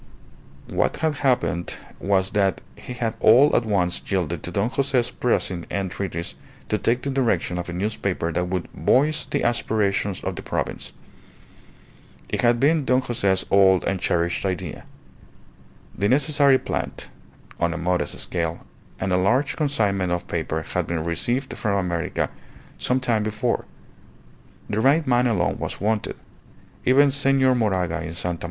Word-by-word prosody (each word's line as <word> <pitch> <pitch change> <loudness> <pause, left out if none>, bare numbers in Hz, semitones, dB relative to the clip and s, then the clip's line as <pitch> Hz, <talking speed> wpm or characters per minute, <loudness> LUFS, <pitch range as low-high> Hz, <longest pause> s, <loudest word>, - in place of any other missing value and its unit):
_" - - -9
What - - +1
had 155 -3 0
happened 125 -10 0 0.2
was 95 -1 +1
that 100 -2 +1
he 125 - -8
had 115 -2 -2
all 130 +7 +6
at 115 - +1
once 90 -4 +1
yielded 85 -4 -1
to - - -5
Don 100 +6 0
Jose's 130 -3 +1
pressing 95 -7 -1
entreaties 95 -3 -3 0.4
to 105 - 0
take 120 +2 +1
the 140 - -2
direction 115 -9 0
of 90 - -5
a - - -4
newspaper 95 -3 -2
that 90 +2 -1
would 90 -1 -2
"voice 150 +4 +2
the - - -1
aspirations 105 -4 0
of - - -3
the - - -6
province." - - -4 1.4
It - - 0
had 120 -1 +3
been 150 +3 +3
Don 130 0 +2
Jose's 100 -7 +1
old 95 -2 +5
and 95 - -1
cherished 85 -1 0
idea. 90 -4 -4 1.1
The 100 +2 0
necessary 140 0 +4
plant - - -4 0.5
(on 85 - +1
a - - -3
modest 90 +1 -1
scale) 85 -2 -3 0.3
and 95 -1 -1
a - - +4
large 125 +10 +2
consignment 105 - 0
of 90 0 -1
paper 80 -1 -2
had - - -2
been 85 -2 -2
received 120 - -1
from 100 -3 -1
America 90 -2 -1 0.5
some 125 +1 +1
time 120 -4 +1
before; 110 +3 -1 1.0
the 105 - -1
right 145 +6 +4
man 125 0 +3
alone 105 -7 0
was - - -4
wanted. 105 +1 -1 0.7
Even 140 +2 +5
Senor 135 -1 +3
Moraga 95 -8 0
in 85 0 -6
Sta. 90 0 -2
100 Hz, 155 wpm, -23 LUFS, 90-125 Hz, 1.4 s, all